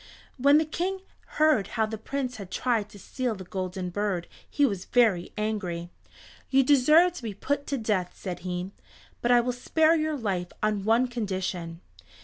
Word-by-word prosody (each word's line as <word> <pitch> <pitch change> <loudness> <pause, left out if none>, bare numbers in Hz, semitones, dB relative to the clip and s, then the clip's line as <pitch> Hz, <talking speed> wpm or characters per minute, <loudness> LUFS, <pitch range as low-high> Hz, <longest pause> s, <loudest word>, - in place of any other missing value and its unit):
When 280 +3 +5
the 315 - +2
King 370 +5 -2 0.4
heard 305 -10 +4
how 220 - +3
the 220 +1 -5
Prince 255 +1 -3
had 200 -4 -8
tried 220 0 0
to 205 - -13
steal 245 +3 -3
the 190 - -8
Golden 185 0 -4
Bird 195 -3 -2 0.2
he 290 - +3
was 200 -8 -2
very 215 -8 +2
angry. 185 -6 -3 0.6
"You 270 0 +4
deserve 305 +6 +5
to 355 - -8
be 220 -4 -5
put 285 +7 -2
to 280 - -1
death," 205 -6 -1
said 180 -2 -6
he, 180 +1 -4 0.5
"but 240 - 0
I 245 -1 +6
will 250 +1 -1
spare 315 +6 +3
your 310 -1 0
life 190 -7 -2
on 210 -2 0
one 230 +3 +3
condition. 185 -7 -4
220 Hz, 175 wpm, -27 LUFS, 185-270 Hz, 0.6 s, I